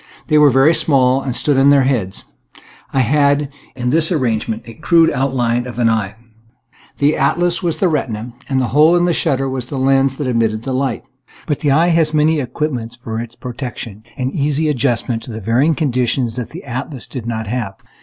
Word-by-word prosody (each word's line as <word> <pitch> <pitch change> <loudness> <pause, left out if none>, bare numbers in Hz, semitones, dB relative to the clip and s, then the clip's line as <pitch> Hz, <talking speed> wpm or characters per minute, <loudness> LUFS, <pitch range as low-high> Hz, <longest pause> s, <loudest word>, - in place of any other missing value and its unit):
They 150 -1 +5
were 150 -1 +7
very 135 +5 +4
small 135 -4 +2
and 130 -3 -3
stood 140 -1 +2
on 135 +1 +5
their 140 -1 +5
heads. 115 -8 -1 0.7
I 135 - +2
had, 145 +2 +2 0.2
in 125 -1 -2
this 160 +1 +2
arrangement, 115 -6 -1
a 115 - -10
crude 165 +7 +3
outline 125 -2 0
of 120 - -8
an 120 -2 +3
eye. 105 -3 -2 0.8
The 145 +2 +2
atlas 175 +5 +1
was 170 -3 -1
the 190 - +2
retina, 120 -7 -3 0.2
and 135 -1 +1
the 125 -3 0
hole 155 +4 +5
in 175 0 +3
the 175 - +2
shutter 135 -3 0
was 130 -2 -3
the 140 - -5
lens 135 0 +2
that 145 - -4
admitted 115 -3 0
the 130 - -3
light. 130 -2 -1 0.4
But 150 - -2
the 150 - 0
eye 160 +5 +3
has 160 -2 +2
many 155 +1 +3
equipments 125 -3 -3
for 115 -2 -6
its 120 0 -7
protection 120 -4 -7
and 130 0 -2
easy 150 +2 0
adjustment 120 -4 0
to 115 -3 -7
varying 120 +9 +2
conditions 125 -5 0
that 125 -3 -4
the 175 - -9
atlas 130 0 -6
did 120 -4 -7
not 110 -1 -3
have. 110 -3 -3
130 Hz, 195 wpm, -17 LUFS, 120-150 Hz, 0.8 s, were